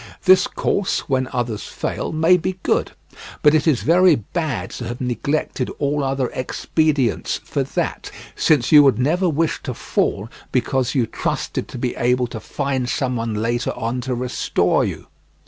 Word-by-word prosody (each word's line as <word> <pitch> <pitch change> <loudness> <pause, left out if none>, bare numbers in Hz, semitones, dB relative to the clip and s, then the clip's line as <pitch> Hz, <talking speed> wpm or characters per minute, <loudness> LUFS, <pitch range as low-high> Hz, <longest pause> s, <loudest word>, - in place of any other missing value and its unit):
This 185 -1 +6
course, 200 - -1
when 130 -2 0
others 120 -4 -2
fail, - - -4
may 160 +3 +4
be 185 +1 -2
good, - - 0 0.5
but 150 - +6
it 155 +1 +2
is 145 -7 +2
very 175 +1 +5
bad 115 - -3
to 120 - -6
have 120 +1 -5
neglected 130 +1 -2
all 145 0 0
other 135 -1 -1
expedients 135 - 0
for - - -3
that, - - -3 0.3
since 150 -6 +2
you 150 -2 +9
would 135 -2 +4
never 170 +8 +1
wish 160 +1 0
to - - -5
fall 100 - -1 0.2
because 130 +1 0
you 125 -4 +3
trusted - - -3
to - - -8
be 125 0 -2
able 125 +1 +2
to 115 -2 -7
find 135 -1 -2
someone 120 -5 -1
later 115 +3 -1
on 120 +2 -2
to 130 0 -2
restore 125 0 +1
you. - - -4
130 Hz, 165 wpm, -21 LUFS, 120-155 Hz, 0.5 s, you